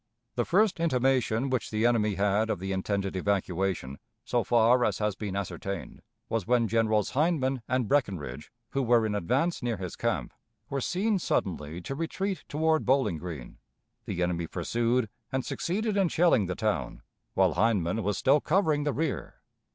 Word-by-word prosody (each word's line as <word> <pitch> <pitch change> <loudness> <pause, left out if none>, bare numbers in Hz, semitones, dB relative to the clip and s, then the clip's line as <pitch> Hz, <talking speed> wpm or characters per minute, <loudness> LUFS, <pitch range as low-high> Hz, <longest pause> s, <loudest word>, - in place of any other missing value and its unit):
The 120 - 0
first 195 0 +3
intimation 130 -4 +1
which 130 -3 -1
the 110 +1 0
enemy 110 -4 +2
had 105 +3 +1
of 105 - 0
the 95 +2 -4
intended 95 0 -1
evacuation, 95 -7 -1 0.3
so - - +1
far 120 +1 +4
as - - +1
has 105 -2 -1
been 100 -1 -4
ascertained, 100 -1 -5 0.3
was 110 -5 -2
when 120 -2 +3
Generals 110 -1 +1
Hindman 135 -3 +1
and 125 -3 0
Breckinridge, 90 - -1 0.2
who 135 - 0
were 120 -2 +3
in 105 - -1
advance 135 - 0
near 120 -3 -1
his 90 -3 -5
camp, - - -2 0.4
were 140 0 -1
seen 195 - 0
suddenly 85 - -2
to 135 - -5
retreat 185 +6 -3
toward 160 +1 +2
Bowling 125 - +2
Green. 80 -8 -8 0.5
The 90 - -2
enemy 85 -1 -1
pursued, 115 +8 0 0.2
and 130 -2 -1
succeeded 205 - -1
in 195 -4 +3
shelling 160 - +3
the 90 - -2
town, - - -2 0.3
while - - +4
Hindman 105 0 +1
was 105 -2 -1
still 140 +2 +4
covering 155 -5 +2
the 145 - +1
rear. 160 +3 -2
115 Hz, 165 wpm, -28 LUFS, 95-140 Hz, 0.5 s, far